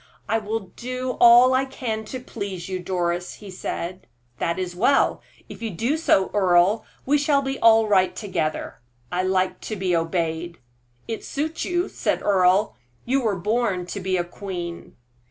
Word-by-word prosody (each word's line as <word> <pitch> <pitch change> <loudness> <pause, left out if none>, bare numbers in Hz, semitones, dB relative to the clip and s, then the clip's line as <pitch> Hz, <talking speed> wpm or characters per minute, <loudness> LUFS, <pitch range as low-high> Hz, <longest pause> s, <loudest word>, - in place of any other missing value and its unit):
"I 225 - +1
will 210 -3 -4
do 255 +1 -3
all 240 +2 +8
I 260 +1 +3
can 230 -5 -4
to 255 +4 -6
please 200 -7 -6
you, 185 -1 -3
Doris," 175 -1 -2
he 205 -2 -11
said. 185 0 -5 0.3
"That 170 +1 -1
is 180 -1 -3
well; 245 +9 +3 0.3
if - - -11
you 225 - -2
do 230 - -1
so, 255 -12 +2
Earle, 190 +1 +3 0.2
we 290 +2 +3
shall 285 -1 +2
be 270 0 -3
all 225 -1 +6
right 190 -3 +3
together. 160 - -3 0.3
I 180 - 0
like 185 0 0
to 215 - -4
be 185 -3 0
obeyed." 165 0 -2 0.5
"It 225 - -4
suits 310 +3 -3
you," 355 +1 0
said - - -2
Earle; 195 +1 +3 0.3
"you 270 +3 +1
were 220 -5 0
born 205 -1 0
to 200 - -5
be 185 0 0
a 175 - +1
queen." 175 -2 -7
200 Hz, 170 wpm, -23 LUFS, 180-235 Hz, 0.5 s, all